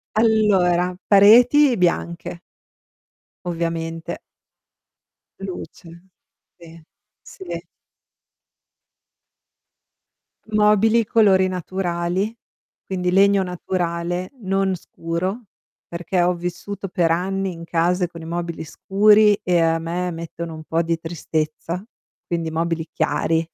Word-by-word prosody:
Allora, 195 -5 +3
pareti 240 +7 +6
bianche 170 -1 -1 1.1
ovviamente. 165 -1 -3 1.2
Luce, 180 -2 -8 0.7
sì, 165 -1 -14 0.4
sì. 175 -2 -8 2.9
Mobili: 215 +2 +3
colori 200 -4 +4
naturali, 185 +3 -2 0.5
quindi 180 -2 -2
legno 195 +1 +4
naturale, 175 0 -3
non 195 -1 0
scuro, 180 +6 -4 0.4
perché 175 +2 -2
ho 180 +1 +2
vissuto 180 +3 -5
per 175 -2 +1
anni 190 +2 -1
in 165 0 -10
casa 175 +2 +1
con 170 -1 -11
i - - -9
mobili 170 0 -4
scuri 205 +5 +4
e 180 -1 +2
a 165 0 +2
me 170 +2 -3
mettono 165 0 -7
un 155 - -9
po' 165 +1 0
di 165 0 -1
tristezza, 160 +1 -4 0.4
quindi 170 -2 -2
mobili 165 0 -2
chiari. 160 +1 0
175 Hz, 95 wpm, -21 LUFS, 165-195 Hz, 2.9 s, pareti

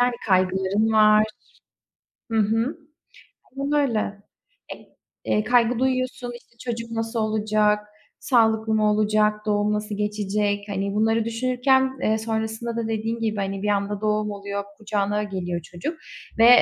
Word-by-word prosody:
Yani 245 0 +3
kaygıların 190 +3 +2
var. 215 0 +6 1.1
Hı 225 - +1
hı. 225 +5 +1 0.8
Aynen 275 +1 -2 0.2
öyle. 210 -3 -2 0.5
E - - -11 0.5
eee, 210 - +1
kaygı 240 0 +3
duyuyorsun. 255 -1 -1
İşte 235 0 -17
çocuk 230 0 -6
nasıl 225 0 -2
olacak? 215 -1 +2 0.4
Sağlıklı 220 -3 +2
mı 215 -1 +3
olacak? 210 0 +3
Doğum 210 0 +1
nasıl 210 0 -3
geçecek? 210 0 0
Hani 200 0 -2
bunları 225 +1 +2
düşünürken, 255 +3 +2 0.3
ııı, 220 0 +2
sonrasında 220 +1 -3
da 230 -1 -2
dediğin 225 +1 -2
gibi, 220 -2 -1
hani 195 -1 -2
bir 210 - 0
anda 200 0 -1
doğum 210 0 0
oluyor, 200 0 -4
kucağına 210 -1 -1
geliyor 180 -4 -3
çocuk 175 - -6 0.4
ve 225 +1 +7
215 Hz, 135 wpm, -24 LUFS, 205-230 Hz, 1.1 s, ve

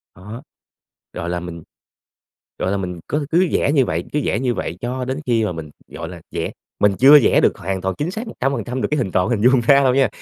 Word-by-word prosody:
Đó, 105 +8 -10 0.7
gọi 85 - -4
là, 90 0 -2
mình, 85 -2 -8 1.0
gọi 95 - -1
là, - - 0
mình 90 -3 -5
có 150 0 -1
cứ 175 +2 +3
vẽ 140 - +2
như 135 -4 +4
vậy, 80 +2 -2
cứ 150 - 0
vẽ 110 - 0
như 125 -2 0
vậy 85 -4 -4
cho 125 +2 -3
đến 130 +3 -3
khi 115 -3 +2
mà 105 - -2
mình, 80 -3 -8 0.2
gọi - - -7
là, - - -10
vẽ - - -3 0.3
mình 105 -1 +4
chưa 145 +3 +8
vẽ - - +4
được - - +2
hoàn 95 +2 -3
toàn 95 0 -2
chính 155 +4 -1
xác 220 +5 -6
100% 130 - -3
được - - 0
cái 150 - +2
hình 100 -7 -1
tròn 90 0 +1
hình 110 -4 0
vuông 130 -2 +4
ra 140 +3 +4
đâu 130 -1 +3
nha. 135 -2 +3
120 Hz, 245 wpm, -20 LUFS, 95-135 Hz, 1.0 s, chưa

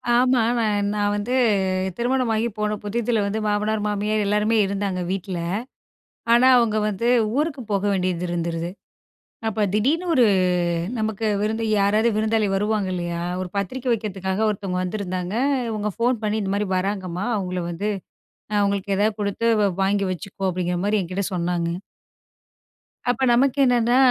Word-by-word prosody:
ஆமா, 250 -1 +4 0.2
நான் 205 -2 +1
நான் 205 0 +1
வந்து 215 +5 -2 0.6
திருமணமாகி 235 -2 +1
போன 210 0 0
புதிதுல 225 +1 0
வந்து 210 +2 -1
மாமனார், 210 +1 0
மாமியார் 210 +1 0
எல்லாருமே 210 +2 +2
இருந்தாங்க 195 -2 -2
வீட்டில. 190 -2 -3 0.9
ஆனா 245 +2 +6
அவங்க 220 -2 +2
வந்து 210 +4 -2 0.3
ஊருக்கு 300 -3 -1
போக 200 -1 +1
வேண்டியது 180 -2 -1
இருந்துருது. 170 0 -2 0.8
அப்போ 220 0 -1
திடீர்னு 285 +12 +1
ஒரு 250 - +5 0.8
நமக்கு 220 0 -1
விருந்து 220 +2 -1
யாராரு 210 +3 +3
விருந்தாளி 220 0 +1
வருவாங்க 205 -1 0
இல்லையா, 170 -1 -3 0.2
ஒரு 185 - -4
பத்திரிக்கை 245 +6 -2
வைக்கிறதுக்காக 200 -1 -1
ஒருத்தவங்க 195 -3 -3
வந்திருந்தாங்க. 185 -1 -3 0.4
இவங்க 210 -1 -2
ஃபோன் 240 0 +1
பண்ணி, 215 +1 0
"இந்த 195 0 -2
மாதிரி 205 -1 -1
வராங்கம்மா. 185 0 -2
அவங்கள 180 -3 -2
வந்து, 205 +5 -2 0.6
அ - - 0
அவுங்களுக்கு 200 -1 0
ஏதாது 210 +1 +2
கொடுத்து 205 +3 -1 0.4
வாங்கி 200 +1 +1
வச்சுக்கோ." 190 +2 -4
அப்படிங்கிற 180 0 -2
மாதிரி 205 +1 +2
என்கிட்ட 185 +2 -3
சொன்னாங்க. 170 -1 -1 1.4
அப்ப 245 - 0
நமக்கு 265 +2 +3
என்னன்னா, 245 0 +3
205 Hz, 135 wpm, -23 LUFS, 190-220 Hz, 1.4 s, ஆனா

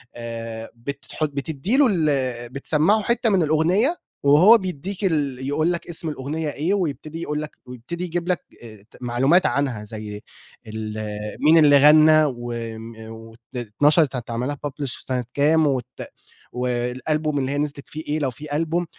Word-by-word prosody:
آآ 115 -1 -6
بتت 140 +4 -8
حُط 155 -1 -1
بتدّي 155 - -1
له 285 -2 +6
ال 130 -8 0
بتسمعه 155 - +2
حتّة 235 +2 +1
من 190 -4 +3
الأغنية 175 - +2 0.3
وهو 170 +11 +7
بيدّيك 190 +1 -5
ال 140 -6 -1
يقول 155 +4 +1
لك 170 - -5
اسم 165 -1 -3
الأغنية 150 +2 -3
إيه، 160 +7 -1
ويبتدي 165 -3 -3
يقول 150 -2 -2
لك 155 - -6
ويبتدي 125 +8 -7
يجيب 175 0 -3
لك 180 -4 0 0.2
آآ، 110 -3 -12
ت - - -16
معلومات 130 +9 +3
عنها 130 -7 0
زي 105 -1 -7 0.5
ال 110 0 -5 0.4
مين 160 +2 +5
اللي 145 -2 +7
غنى 155 +2 +7
وم 115 -3 -5
وأتل 115 +1 -12
اتنشرت 145 +6 +2
هيتعمل 120 +1 -3
لها 145 - -2
publish 145 0 -5
في - - -10
سَنة 125 -2 -2
كام 155 +2 +3
وت 130 -4 0 0.7
والألبوم 125 +5 -1
اللي 135 0 -1
هي 145 - -2
نزلت 145 -1 -3
فيه 155 +1 -6
إيه 150 +1 0
لو 135 -3 -1
في 145 +4 -6
ألبوم 165 +3 0
145 Hz, 165 wpm, -22 LUFS, 125-160 Hz, 0.7 s, وهو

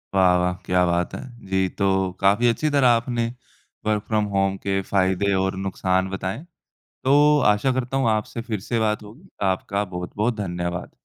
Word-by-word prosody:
वाह, 90 -2 +5
वाह! 90 0 +1
क्या 90 0 +2
बात 85 0 0
है। - - -6 0.3
जी 95 0 +2
तो 95 -2 +1
काफ़ी 100 +5 +3
अच्छी 120 +7 +1
तरह 140 -3 +3
आपने 120 0 +2 0.6
वर्क़ 105 -1 0
फ्रॉम 105 -1 +1
होम 95 0 +2
के 95 0 -1
फ़ायदे 95 +1 +1
और 95 0 0
नुकसान 95 -1 0
बताएँ। 95 +7 -4 0.6
तो 145 +2 +5
आशा 105 +6 +1
करता 130 +1 -2
हूँ, 130 -4 +2
आपसे 110 +2 -1
फ़िर 110 -4 -4
से 120 - +1
बात 105 -1 0
होगी। 130 - -15 0.2
आपका 100 +2 -2
बहुत-बहुत 95 +6 -2
धन्यवाद। 85 -3 -4
100 Hz, 170 wpm, -23 LUFS, 95-115 Hz, 0.6 s, वाह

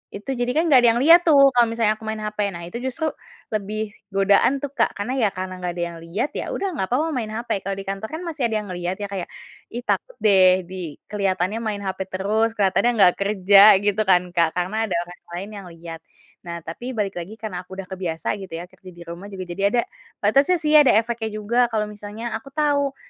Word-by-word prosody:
itu 205 +6 -5
jadi 245 0 0
kan 320 - +3
gak 265 - +8
ada 240 -1 +5
yang 240 - +1
liat 330 +4 +9
tuh 275 -3 +7
kalau 240 -2 +4
misalnya 225 -1 +1
aku 220 - -11
main 220 0 -3
hape, 210 -1 -1
nah 170 - -7
itu 175 +7 -6
justru 265 +5 -2 0.4
lebih 215 0 -3 0.2
godaan 200 +8 +3
tuh, 285 - -3
Kak, - - 0
karena 205 +5 -3
ya 225 - +4
karena 185 -1 -6
gak 180 -1 -3
ada 175 - -2
yang 170 - -10
lihat 170 - -3
ya - - -4
udah 395 -1 -2
gak 190 - -1
papa 300 +8 0
main 250 -7 -2
hape. 230 -3 -2
Kalau 195 +1 -4
di 195 - -6
kantor 195 +3 -5
kan 320 - -6
masih 305 -8 -1
ada 225 - -3
yang - - -11
ngelihat 175 +1 -3
ya - - -2
kayak, 190 -3 -4 0.5
"Ih, 240 +1 -5
takut - - -2
deh 185 -3 +5
di 175 -4 -7 0.2
kelihatannya 195 0 0
main 215 -3 -3
hape 190 -1 -4
terus, 215 +4 0
kelihatannya 195 +3 +2
nggak 190 -5 +5
kerja," 200 +1 +6
gitu 205 +1 +1
kan, 180 -1 +5
Kak, 170 -2 +1
karena 205 +5 -1
ada 185 - -2
orang 175 +1 -13 0.2
lain 190 +4 -5
yang 195 - -9
lihat. 165 0 -9 0.5
Nah 170 -1 -6
tapi 240 +11 -6
balik 200 -4 -2
lagi 180 +6 -8
karena 195 -5 -6
aku 190 - -9
udah 190 -1 -7
kebiasa 180 -3 -3
gitu 190 -3 -9
ya 165 - -5
kerja 185 - -14
di 175 - -13
rumah, 170 +3 -9
juga 195 -2 -7
jadi 195 +3 -4
ada 240 - +4 0.4
batasnya 275 - +4
sih, 305 0 +1
ada 280 -7 +5
efeknya 230 0 0
juga, 215 +3 -3
kalau 220 -2 -1
misalnya 210 +3 -7
aku 265 - -19
tahu 285 -2 +1
205 Hz, 230 wpm, -22 LUFS, 185-235 Hz, 0.5 s, liat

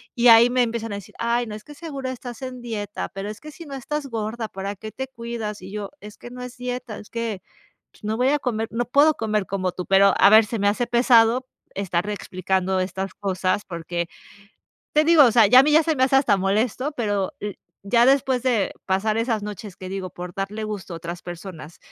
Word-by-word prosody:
Y 245 -1 +3
ahí 230 +1 +8
me 255 0 +2
empiezan 230 -1 -3
a - - -3
decir: 200 -1 -10
"Ay, 235 +1 0
no, 210 - -6
es 215 - -10
que 295 - -12
seguro 280 -5 -5
estás 245 -2 -7
en 255 -1 -6
dieta, 210 -4 -4
pero 195 +1 -6
es 215 - -8
que 305 - -9
si 335 +2 -11
no 285 - -9
estás 285 +3 -4
gorda, 225 -1 -4
¿para 195 +1 -5
qué 215 +2 -8
te 265 +3 -5
cuidas?" 235 -4 -6
Y 190 - -9
yo: 205 -1 -5
"Es 210 0 -11
que - - -10
no 250 0 -9
es 250 0 -9
dieta, 245 -3 -5
es 210 - -13
que, 230 -5 -3 0.5
pues, - - -24
no 215 +1 -2
voy 250 +2 +3
a 295 - +3
comer 225 -4 -2
no 235 +2 -1
puedo 285 +5 +4
comer 215 -2 -1
como 185 -2 -1
tú". 180 - -5
Pero 195 0 +5
a 200 - +7
ver, 220 +1 +7
se 225 +1 -4
me 200 - +2
hace 215 +4 +1
pesado 240 +1 +4 0.3
estar 185 -1 -1
explicando 190 -1 -1
estas 190 +1 -4
cosas, 190 0 -1
porque, 170 0 -4 0.9
te 305 +1 +5
digo, 325 -1 +7
o 240 - +4
sea, 225 -2 +6
ya 250 +4 +8
a - - +6
mí 300 - +2
ya 315 +2 +6
se 320 0 +1
me 260 - +1
hace 270 +1 +3
hasta 250 -7 +4
molesto, 220 +9 0
pero 205 -5 -1
l 205 -2 -5 0.3
ya 235 +2 +5
después 265 -2 +3
de 240 -6 +1
pasar 200 +3 +1
esas 225 -2 0
noches, 210 -2 -7
que 185 - -8
digo, 190 -1 -5
por 175 0 -8
darle 205 +2 -4
gusto 200 -4 -6
a - - -5
otras 170 +1 -7
personas, 175 -2 -9
220 Hz, 235 wpm, -23 LUFS, 195-250 Hz, 0.9 s, ahí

